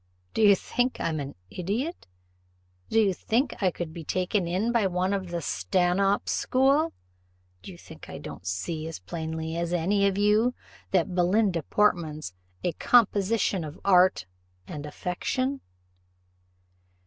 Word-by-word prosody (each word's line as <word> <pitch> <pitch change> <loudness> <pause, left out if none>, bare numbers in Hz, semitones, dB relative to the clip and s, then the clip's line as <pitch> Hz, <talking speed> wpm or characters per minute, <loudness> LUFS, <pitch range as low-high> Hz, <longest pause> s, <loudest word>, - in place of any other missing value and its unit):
Do - - 0
you 205 -2 +7
think 245 +6 -1
I'm 160 -2 -1
an 140 0 -6 0.2
idiot? 225 - -3 0.8
do 225 - +3
you 200 -3 +3
think 235 +6 -1
I 190 - +4
could 170 -2 -6
be 165 - -7
taken 185 +3 0
in 190 +7 0
by 230 -4 +2
one 185 +1 0
of 190 -2 -3
the 170 -2 -3
Stanhope 190 +4 +1
school? 275 +5 +2 0.7
Do - - -9
you 85 - -12
think - - -13
I - - -7
don't 90 - -9
see 155 - -3
as 165 - -6
plainly 160 - -5
as 170 0 -2
any 200 +4 +2
of 195 -1 -1
you 210 +4 +3 0.3
that 185 -1 +1
Belinda 180 0 +2
Portman's 155 - 0 0.3
a 175 - +1
composition 205 -1 +2
of 150 0 -8
art 185 - +5 0.4
and 150 +8 -7
affectation?" 255 - -2
185 Hz, 145 wpm, -27 LUFS, 165-210 Hz, 0.8 s, you